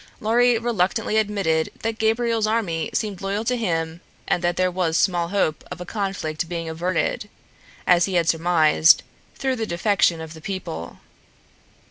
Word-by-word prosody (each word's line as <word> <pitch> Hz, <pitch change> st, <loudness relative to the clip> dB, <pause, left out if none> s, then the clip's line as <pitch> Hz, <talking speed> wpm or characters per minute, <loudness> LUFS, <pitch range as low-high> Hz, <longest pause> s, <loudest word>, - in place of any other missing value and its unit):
Lorry 240 Hz, +2 st, +3 dB
reluctantly 220 Hz, -1 st, 0 dB
admitted 195 Hz, -7 st, +1 dB
that 225 Hz, 0 st, -2 dB
Gabriel's 225 Hz, 0 st, +1 dB
army 200 Hz, -8 st, -1 dB
seemed 205 Hz, -4 st, -3 dB
loyal 200 Hz, +3 st, -2 dB
to 250 Hz, -, +1 dB
him 165 Hz, -7 st, -2 dB, 0.3 s
and 175 Hz, -, 0 dB
that 175 Hz, 0 st, 0 dB
there 185 Hz, 0 st, +2 dB
was 175 Hz, -2 st, 0 dB
small 175 Hz, -3 st, +2 dB
hope 170 Hz, -4 st, 0 dB
of -, -, -7 dB
a 180 Hz, -, -6 dB
conflict 175 Hz, -6 st, -3 dB
being 170 Hz, -2 st, -4 dB
averted, 175 Hz, +5 st, -2 dB, 0.6 s
as 175 Hz, -1 st, +5 dB
he 190 Hz, -, -3 dB
had 170 Hz, -2 st, +2 dB
surmised, 160 Hz, -1 st, +4 dB, 0.3 s
through 265 Hz, -1 st, -1 dB
the 225 Hz, -1 st, -2 dB
defection 175 Hz, -1 st, +2 dB
of 160 Hz, 0 st, -8 dB
the 160 Hz, -, -12 dB
people. 155 Hz, -, -6 dB
185 Hz, 155 wpm, -23 LUFS, 165-215 Hz, 0.6 s, as